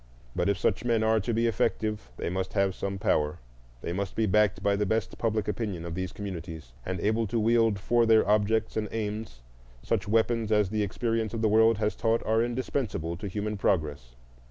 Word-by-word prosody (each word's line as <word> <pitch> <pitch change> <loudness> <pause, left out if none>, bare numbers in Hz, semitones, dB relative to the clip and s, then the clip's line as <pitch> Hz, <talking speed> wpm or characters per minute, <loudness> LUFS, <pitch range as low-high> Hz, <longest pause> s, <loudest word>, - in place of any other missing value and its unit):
But 90 +2 +1
if 100 - +1
such 95 - 0
men 115 -2 +2
are 110 0 +3
to 105 +4 -2
be 115 +1 +1
effective 110 - -1
they - - -3
must 95 0 -3
have 100 -1 +2
some 100 +1 -4
power,—they 60 - -3
must 100 +1 -3
be 110 - +2
backed 105 -1 +2
by 100 0 +3
the 105 - 0
best 110 +2 -1
public 110 -3 0
opinion 105 -6 -3
of 85 - -5
these 95 +1 -3
communities, 85 -9 -7
and 95 -1 -3
able 110 +2 +1
to 115 +4 -1
wield 115 -1 +3
for 115 +4 +2
their 110 -2 +5
objects 105 +1 +2
and 105 -2 -1
aims 105 - -4 0.4
such - - -1
weapons 115 +1 +1
as 105 -3 +3
the 110 -1 0
experience 115 +2 -1
of 115 - -3
the 110 - +4
world 110 +1 +5
has 105 0 0
taught 115 0 0
are 110 +1 +2
indispensable 120 - -2
to 100 - -5
human 105 +2 -3
progress. 75 -11 -1
105 Hz, 200 wpm, -28 LUFS, 95-110 Hz, 0.4 s, their